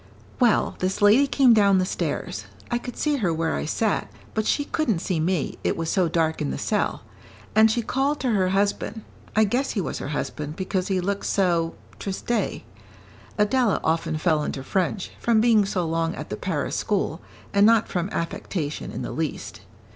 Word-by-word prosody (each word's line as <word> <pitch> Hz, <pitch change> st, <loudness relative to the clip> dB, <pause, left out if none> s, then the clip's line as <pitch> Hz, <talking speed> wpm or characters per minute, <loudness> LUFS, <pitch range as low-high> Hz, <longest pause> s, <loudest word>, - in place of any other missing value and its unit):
"Well, 240 Hz, -4 st, +3 dB
this 185 Hz, +1 st, -1 dB
lady 215 Hz, +8 st, +6 dB
came 265 Hz, -3 st, +5 dB
down 200 Hz, -3 st, +5 dB
the 185 Hz, -, +2 dB
stairs. -, -, -3 dB, 0.3 s
I 240 Hz, -, +1 dB
could 245 Hz, 0 st, -8 dB
see 300 Hz, -1 st, +1 dB
her 195 Hz, -9 st, +1 dB
where 160 Hz, 0 st, 0 dB
I -, -, -2 dB
sat, 210 Hz, +6 st, 0 dB, 0.2 s
but 220 Hz, -1 st, -1 dB
she 290 Hz, -, +1 dB
couldn't 285 Hz, -, 0 dB
see 170 Hz, 0 st, -2 dB
me, 165 Hz, -1 st, -1 dB
it -, -, 0 dB
was 165 Hz, -1 st, -2 dB
so 185 Hz, -3 st, +2 dB
dark 160 Hz, -1 st, 0 dB
in -, -, -1 dB
the 65 Hz, -, -3 dB
cell; -, -, -1 dB, 0.5 s
and 220 Hz, +1 st, +7 dB
she 235 Hz, +2 st, 0 dB
called 275 Hz, +5 st, 0 dB
to 255 Hz, -, +1 dB
her 190 Hz, -4 st, +2 dB
husband 200 Hz, +3 st, 0 dB, 0.3 s
I 220 Hz, -, +5 dB
guess 250 Hz, +6 st, 0 dB
he 215 Hz, -, -1 dB
was 180 Hz, -, -3 dB
her -, -, -5 dB
husband, 150 Hz, +1 st, -4 dB
because 185 Hz, 0 st, -2 dB
he 190 Hz, -2 st, +1 dB
looked 200 Hz, +2 st, -2 dB
so 170 Hz, -4 st, +1 dB, 0.2 s
triste." 205 Hz, +4 st, -2 dB, 0.8 s
Adela 215 Hz, +1 st, +2 dB
often 160 Hz, -1 st, 0 dB
fell 155 Hz, -2 st, +2 dB
into 135 Hz, -2 st, -4 dB
French, 190 Hz, +4 st, -1 dB
from 230 Hz, -2 st, +3 dB
being 220 Hz, -2 st, +4 dB
so 185 Hz, -3 st, -1 dB
long 165 Hz, +1 st, -1 dB
at -, -, -8 dB
the -, -, -1 dB
Paris -, -, -2 dB
school, -, -, -1 dB, 0.3 s
and 200 Hz, 0 st, +4 dB
not 225 Hz, +1 st, +5 dB
from 180 Hz, +1 st, -2 dB
affectation 165 Hz, -3 st, -3 dB
in -, -, -5 dB
the -, -, -4 dB
least. 160 Hz, -2 st, -4 dB
195 Hz, 190 wpm, -24 LUFS, 165-225 Hz, 0.8 s, and